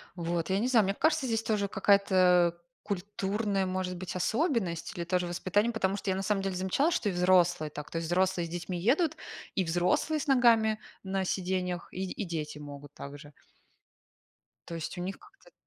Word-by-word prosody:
Вот. 170 0 -2
Я 190 - +2
не 240 - +1
знаю, 235 -4 +5
мне 195 - 0
кажется, 310 +3 +1
здесь 225 -3 0
тоже 205 -2 0
какая-то, 185 -4 +4
э, - - -29 0.2
культурная, 200 +1 -1
может 185 0 -2
быть, 180 +1 -6
особенность, 215 - 0
или 170 - -3
тоже 180 +1 0
воспитание, 185 +6 0
потому 195 -4 0
что 200 0 -4
я 190 - +1
на - - -1
самом 195 0 0
деле 195 -1 -2
замечала, 190 - +1
что 240 - 0
и - - -1
взрослые 175 -3 +3
так. 150 0 -8
То - - -4
есть 165 0 -2
взрослые 180 0 +1
с 165 - -8
детьми 175 +1 -4
едут, 290 - +2 0.4
и 190 - +2
взрослые 180 - +1
с 300 - -5
ногами 230 -5 +4 0.2
на 190 0 -1
сиденьях 180 -1 -2
и 185 - -3
и 210 - -4
дети 155 -4 -4
могут 145 0 -10
так 140 +1 -8
же. 145 0 -13 1.4
Но 170 - -5
есть 165 +3 -5
у - - -3
них 190 +2 -4
как-то. 420 +4 -20
190 Hz, 195 wpm, -30 LUFS, 175-215 Hz, 1.4 s, знаю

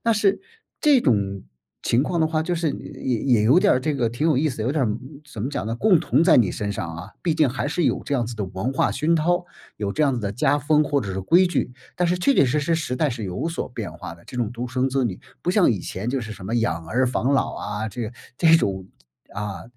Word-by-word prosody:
那 230 - +4
是， 205 -2 +2 0.4
这 290 -4 +5
种 100 - +1 0.4
情 120 +3 +2
况 170 +3 -1
的 160 - +4
话 155 0 0
就 175 +2 -1
是 165 -3 0
也 125 -3 -4
也 120 -6 +3
有 130 +10 +5
点 205 - +4
儿 - - +2
这 150 +2 -1
个 125 -4 +1
挺 120 +8 -1
有 150 -5 +3
意 155 +2 +2
思， 115 -5 -4
有 125 - 0
点 150 -3 +1
儿 - - +1 0.4
怎 110 - -6
么 130 - -2
讲 105 - -3
呢， 115 +1 -2
共 185 - +4
同 165 - +2
在 170 - +6
你 100 -6 +3
身 100 -1 -3
上 85 -4 -5
啊， 90 +5 -9
毕 165 -3 +1
竟 155 -2 +4
还 135 +3 -2
是 165 +1 0
有 - - +1
这 145 - -2
样 120 -3 +1
子 120 - -6
的 105 - -2
文 95 +7 -3
化 135 - +1
熏 165 +2 +1
陶， 175 +3 +1 0.3
有 100 -2 -2
这 155 - 0
样 140 -3 +3
子 120 - -2
的 100 -1 -3
家 145 +3 +2
风， 150 +2 +3
或 145 0 +1
者 100 -6 -4
是 95 - -3
规 175 - +4
矩， 175 -7 -1 0.2
但 175 -1 +1
是 180 +1 +1
确 275 +10 +3
确 - - +5
实 140 +5 +1
实 165 +3 +1
时 140 -6 -2
代 150 -1 +1
是 115 -1 -5
有 90 - -3
所 165 - -4
变 - - -6
化 85 - -8
的， 85 - -20
这 - - -12
种 120 -3 -1
独 120 +1 -4
生 130 +1 0
子 135 0 0
女， 95 -6 -3 0.2
不 - - +1
像 - - +4
以 - - 0
前 100 +6 -5
就 135 0 -1
是 110 -1 -6
什 95 -3 -9
么 115 - -2
养 85 -8 -1
儿 130 +7 +1
防 130 +2 0
老 - - 0
啊， 105 +1 -4
这 115 +1 -5 0.2
这 165 -1 +5
种， 95 - -1 0.5
啊， 100 -4 -4
130 Hz, 295 characters per minute, -23 LUFS, 110-155 Hz, 0.5 s, 在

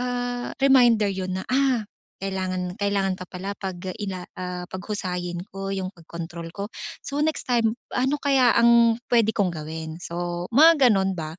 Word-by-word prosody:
ah, 245 0 -2
reminder 240 -6 +5
'yon 185 -1 -3
na, 190 - -3
"Ah, 260 -3 +2 0.4
kailangan 185 -1 -3
kailangan 200 -2 +1
pa 185 - -7
pala 185 +2 -6
'pag 190 -2 -4 0.2
ila 195 -3 -4 0.2
ah, 180 -1 -4
paghusayin 180 -3 -4
ko 195 0 -5
'yung 190 -1 -3
pagkontrol 170 0 -8
ko. 200 +1 -5 0.3
So, 280 - -4
next 315 0 0
time, 230 -2 +3 0.2
ano 265 +3 +1
kaya 265 -4 +4
ang 235 0 +5
pwede 225 -2 +3
kong 200 -4 +1
gawin?" 160 +1 -6
So, 175 +1 -4
mga 305 -1 +7
gano'n 195 -2 +2
ba 155 0 -5
195 Hz, 160 wpm, -24 LUFS, 180-240 Hz, 0.4 s, mga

